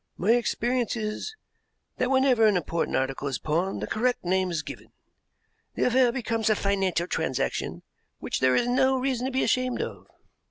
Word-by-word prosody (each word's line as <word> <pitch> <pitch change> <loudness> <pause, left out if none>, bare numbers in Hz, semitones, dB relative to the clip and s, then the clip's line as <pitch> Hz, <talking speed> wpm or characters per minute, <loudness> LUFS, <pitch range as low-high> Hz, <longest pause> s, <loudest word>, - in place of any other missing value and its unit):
"My 200 +5 +2
experience 240 +1 +1
is 215 - -4 0.6
that 250 - 0
whenever 260 -4 +4
an 205 -3 +3
important 170 0 -1
article 135 +1 -2
is 135 -3 -2
pawned 170 +5 -1
the - - 0
correct 245 -2 -1
name 185 +1 +1
is 170 -3 -2
given. - - -9 0.8
The - - 0
affair 250 0 +4
becomes 230 -3 -1
a 215 - +4
financial 195 -4 0
transaction - - -2 0.3
which - - -3
there 130 0 +3
is 240 - +2
no 260 +1 +3
reason 255 -1 -1
to - - -3
be 260 - +1
ashamed 255 -1 +1
of." - - -5
225 Hz, 170 wpm, -26 LUFS, 185-255 Hz, 0.8 s, whenever